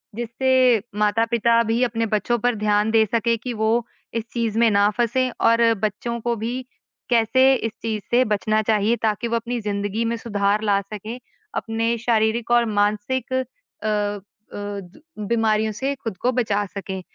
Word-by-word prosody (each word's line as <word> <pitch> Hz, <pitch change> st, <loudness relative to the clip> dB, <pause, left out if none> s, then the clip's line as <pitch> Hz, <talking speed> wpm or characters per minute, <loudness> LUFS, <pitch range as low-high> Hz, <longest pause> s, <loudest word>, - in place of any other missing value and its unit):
जिससे 245 Hz, 0 st, +2 dB, 0.2 s
माता-पिता 230 Hz, +2 st, +3 dB
भी 225 Hz, +1 st, 0 dB
अपने 230 Hz, -2 st, 0 dB
बच्चों 220 Hz, +2 st, 0 dB
पर 245 Hz, +2 st, +1 dB
ध्यान 210 Hz, 0 st, +1 dB
दे 220 Hz, -1 st, +4 dB
सकें 230 Hz, +2 st, +1 dB
कि 250 Hz, -, -3 dB
वो 220 Hz, +1 st, +1 dB, 0.3 s
इस 230 Hz, -, -2 dB
चीज़ 230 Hz, -2 st, -1 dB
में 230 Hz, -1 st, +5 dB
ना 200 Hz, 0 st, +4 dB
फँसें 245 Hz, +2 st, +1 dB, 0.2 s
और 230 Hz, 0 st, +5 dB
बच्चों 225 Hz, +3 st, -2 dB
को 235 Hz, +1 st, 0 dB
भी 235 Hz, +4 st, -3 dB, 0.5 s
कैसे 255 Hz, +3 st, +4 dB
इस 225 Hz, -3 st, -2 dB
चीज़ 215 Hz, -2 st, -3 dB
से 245 Hz, +2 st, +5 dB
बचना 215 Hz, 0 st, +1 dB
चाहिए 215 Hz, +1 st, +2 dB
ताकि 220 Hz, +1 st, 0 dB
वो 235 Hz, -, -1 dB
अपनी 235 Hz, +1 st, -2 dB
ज़िंदगी 205 Hz, +2 st, -2 dB
में 230 Hz, +1 st, 0 dB
सुधार 205 Hz, -2 st, 0 dB
ला 200 Hz, -2 st, +3 dB
सकें, 215 Hz, +3 st, -7 dB, 0.4 s
अपने 230 Hz, +1 st, -1 dB
शारीरिक 230 Hz, 0 st, 0 dB
और 240 Hz, 0 st, +5 dB
मानसिक 215 Hz, +6 st, 0 dB
अ 260 Hz, 0 st, +1 dB, 1.1 s
अ, -, -, -7 dB
द 205 Hz, -, -7 dB, 0.3 s
बीमारियों 220 Hz, -1 st, +1 dB
से 265 Hz, +6 st, -2 dB
ख़ुद 225 Hz, -7 st, -6 dB
को 250 Hz, +7 st, +1 dB
बचा 215 Hz, -5 st, 0 dB
सकें। 190 Hz, -1 st, -6 dB
225 Hz, 165 wpm, -22 LUFS, 210-235 Hz, 1.1 s, में